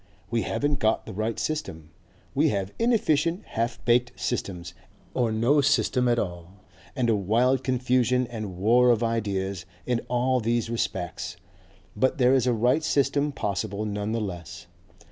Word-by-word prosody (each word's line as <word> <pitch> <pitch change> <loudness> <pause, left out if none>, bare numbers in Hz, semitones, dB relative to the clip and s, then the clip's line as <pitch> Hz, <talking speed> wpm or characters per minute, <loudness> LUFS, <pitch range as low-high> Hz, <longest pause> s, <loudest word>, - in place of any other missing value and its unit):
We 115 -1 +1
haven't 145 +3 -1
got 110 -2 +1
the - - -8
right 110 +3 -2
system, 80 - -4 0.4
we - - +3
have 100 -1 -2
inefficient 175 -7 +2
half 115 +1 -3
baked 120 -4 +2
systems, 90 -1 -3 0.4
or 120 -3 +1
no 120 +7 +3
system 130 -2 +2
at 120 -1 +2
all, 85 -4 -4 0.4
and 125 - +1
a 115 - +3
wild 120 +7 +2
confusion 125 0 +1
and 110 -6 -6
war 120 +6 +4
of 120 -1 +3
ideas 100 -5 -1 0.2
in 125 -2 0
all 125 +1 +2
these 115 0 0
respects. 90 -7 -3 0.6
But 130 +5 +1
there 125 -1 +4
is 130 -2 +3
a - - +4
right 125 +7 +2
system 145 -1 +1
possible 100 -3 -3
none 105 0 -3
the 115 - 0
less. 90 -6 -6
115 Hz, 155 wpm, -26 LUFS, 100-130 Hz, 0.6 s, war